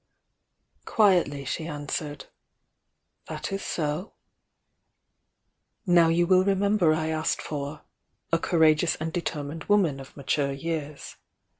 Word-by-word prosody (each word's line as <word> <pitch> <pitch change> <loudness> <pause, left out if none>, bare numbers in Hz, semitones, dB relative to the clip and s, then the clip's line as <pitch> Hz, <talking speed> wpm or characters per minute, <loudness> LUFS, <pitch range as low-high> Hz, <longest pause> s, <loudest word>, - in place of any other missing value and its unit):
Quietly 175 - +2
she 160 +5 -3
answered: 145 -1 -4 1.0
"That - - -5
is 195 0 -3
so." 155 +4 -3 1.7
"1 175 -2 +3
ow 170 -1 +7
you 170 +1 +3
will 185 +1 +5
remember 200 -3 +2
I 155 0 0
asked 160 0 -1
for 145 0 -5 0.5
'a 165 - +3
courageous 160 -1 +3
and 160 +1 -5
determined 160 -2 -4
woman 185 -9 +2
of 135 +2 -12
mature 140 0 0
years.' 150 0 -5
160 Hz, 115 wpm, -26 LUFS, 145-175 Hz, 1.7 s, ow